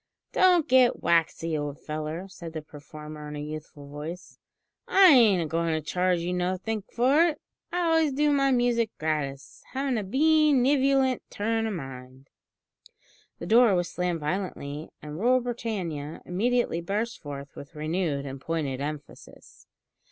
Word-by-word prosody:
"Don't 360 -4 +4
get 255 -1 +4
waxy, 165 -1 +1
old 145 -1 -4
feller," 155 +4 -5
said 170 -4 -10
the 155 -1 -5
performer 150 0 -10
in 150 - -7
a - - -5
youthful 150 -1 -8
voice, 150 +5 -8 0.5
"I 385 -1 +7
ain't 215 - +5
a - - -3
goin' 165 +1 -1
to - - 0
charge 180 +3 0
you 175 +1 -2
nothink 185 +4 -2
for 265 +6 +3
it. 310 -3 -3 0.3
I 355 - 0
always 325 -3 +3
do 295 +2 +2
my 275 -1 +3
music 240 -3 +2
gratis; 150 -3 -3
havin' 265 -3 0
a - - -3
bee 305 +8 +3
nevolient 265 -1 +3
turn 225 +2 -1
o' - - -2
mind." 135 -5 -8 1.1
The - - -7
door 225 +1 +5
was 175 -1 -1
slammed 180 -2 -2
violently, 150 -3 -4
and 150 +1 -7
"Rule 250 +4 +4
Britannia" 195 - -4
immediately 225 -1 0
burst 210 +6 -3
forth 140 -2 -8
with 140 - -11
renewed 155 -2 -2
and 135 -1 -7
pointed 145 -5 -2
emphasis. 145 -1 -9
180 Hz, 150 wpm, -27 LUFS, 150-245 Hz, 1.1 s, I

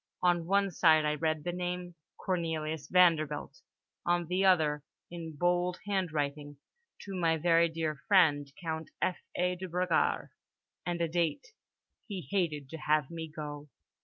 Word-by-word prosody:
On 175 -2 +2
one 200 +1 +2
side 160 -3 +4
I 150 - +2
read 155 0 -1
the 175 - -2
name 180 0 -4 0.2
"Cornelius 160 -4 -2
Vanderbilt"—on 170 0 +1
the 180 +3 0
other, 155 -6 +3 0.3
in 165 -2 -7
bold 175 +2 +1
handwriting—"to 160 - -4
my 165 -3 +2
very 170 +1 +4
dear 160 -2 -2
friend 150 -8 +4
Count 160 -2 -4
F.A. 180 0 -1
de 185 +1 -5
Bragard" 180 -1 +1 0.6
and 175 -1 -1
a 170 - +2
date. 170 - -1 0.5
"He 190 - -6
hated 155 -8 0
to 160 - -6
have 150 -2 +1
me 165 -1 -5
go." 150 -1 -7
165 Hz, 135 wpm, -31 LUFS, 155-180 Hz, 0.6 s, side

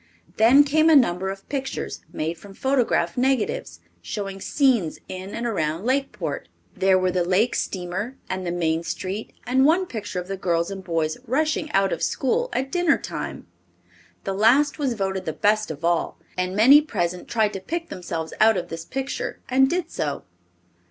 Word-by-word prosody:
Then 245 +6 +7
came 310 +3 +3
a 320 - +7
number 190 -8 +3
of 195 0 -7
pictures 270 -2 -4
made 160 +2 -2
from 195 +3 -14
photograph 265 -1 +1
negatives, 245 - 0 0.2
showing 195 - -5
scenes 245 - +2
in 185 +2 -7
and 235 - -3
around 165 -5 -1
Lakeport. 270 +2 -2 0.3
There 190 0 +4
were 185 0 +1
the 180 -1 +1
lake 190 +7 +2
steamer, 190 +7 -3
and 185 0 -3
the 175 - -2
main 165 -2 0
street, 190 +5 -4
and 260 +2 +3
one 335 +6 +4
picture 215 - -5
of 180 - -7
the 195 0 -4
girls 170 -1 0
and 195 -1 -6
boys 165 0 -1
rushing 305 +4 0
out 195 0 +3
of - - -4
school 485 - 0
at 265 +1 -2
dinner 355 -1 +3
time. - - -6 0.8
The 195 - -2
last 260 +10 +3
was 265 -5 0
voted 190 -2 -2
the 160 - -2
best 215 +4 +1
of 160 +1 -5
all, 170 -1 0 0.2
and 185 +1 -2
many 265 +8 +8
present 180 - -3
tried 220 -3 +1
to 195 - -4
pick 335 - -4
themselves 165 -3 -5
out 220 -1 +6
of 175 -1 -4
this 165 0 -6
picture 270 +1 -4
and 265 +1 +4
did 355 +2 -2
so. 145 -2 -3
200 Hz, 180 wpm, -24 LUFS, 180-265 Hz, 0.8 s, many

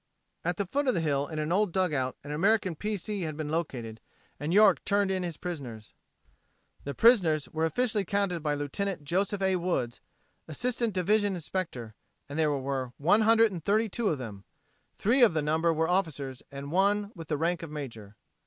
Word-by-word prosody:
At 175 0 -1
the 200 - -1
foot 280 +9 -1
of 255 - +3
the - - +1
hill 145 -3 0
in 155 - -6
an 155 +1 -2
old 200 +1 +2
dugout 150 -9 0
an 145 - -7
American 190 +4 +2
P. 210 +6 -2
C. 205 +2 -4
had 155 -3 -4
been 155 -2 -3
located, 125 -9 -3 0.4
and 150 +3 -2
York 205 +2 +5
turned 200 -1 +1
in 190 -1 0
his 170 -4 -4
prisoners. 130 - -7 0.9
The 140 - -4
prisoners 180 - +4
were 160 0 -1
officially 215 +5 0
counted 195 -2 -1
by 150 -1 0
Lieut. 150 +5 -3
Joseph 195 +5 -1
A. 190 -1 +2
Woods, 150 -10 -2 0.5
Assistant 235 - -1
Division 205 +2 +2
Inspector, 155 -10 -4 0.3
and 145 +3 -5
there 155 -1 +3
were 135 -3 -2
132 215 +3 +3
of 155 - 0
them, 105 -6 -8 0.5
three 245 +6 +2
of 220 -9 +6
the 155 - +2
number 160 +3 +2
were 160 0 +1
officers 145 -8 -1
and 140 +1 -7
one 200 +3 +2
with 165 -4 -9
the 150 - -1
rank 170 +3 0
of 165 - -7
major. 115 -9 -8
170 Hz, 180 wpm, -29 LUFS, 145-200 Hz, 0.9 s, of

